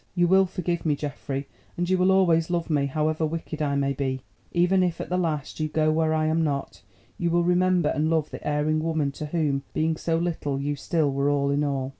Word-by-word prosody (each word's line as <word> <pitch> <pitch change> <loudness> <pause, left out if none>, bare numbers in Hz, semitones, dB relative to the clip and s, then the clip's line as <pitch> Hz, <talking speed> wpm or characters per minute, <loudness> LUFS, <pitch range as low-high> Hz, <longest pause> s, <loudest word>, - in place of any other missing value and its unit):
You 175 -1 +3
will 190 +1 +5
forgive 175 -1 -2
me, 150 -3 +1
Geoffrey, 140 -1 -5 0.3
and 175 0 0
you 185 - +3
will 185 +1 +3
always 170 -4 +3
love 170 -2 -1
me, 140 -2 +2
however 155 +3 -1
wicked 155 0 -3
I 145 -2 0
may 140 0 +1
be; 130 -1 -3 0.3
even 180 +2 +3
if, 175 -2 0
at - - -5
the 180 - 0
last, 155 -5 -2
you 155 - 0
go 155 0 +1
where 160 0 +1
I 155 0 +1
am 160 +1 +1
not, 140 -3 -3 0.4
you 170 - +1
will 175 +1 +2
remember 180 -2 +2
and 155 +1 0
love 160 -2 0
the - - -7
erring 150 +1 +1
woman 155 -3 0
to 150 +2 -6
whom, 150 -4 0
being 160 0 +1
so 165 0 0
little, 160 -5 -2
you 145 +1 -1
still 150 0 0
were 140 +1 +1
all 140 -1 +1
in 145 +1 +1
all. 135 -2 -1
155 Hz, 230 wpm, -25 LUFS, 145-170 Hz, 0.4 s, will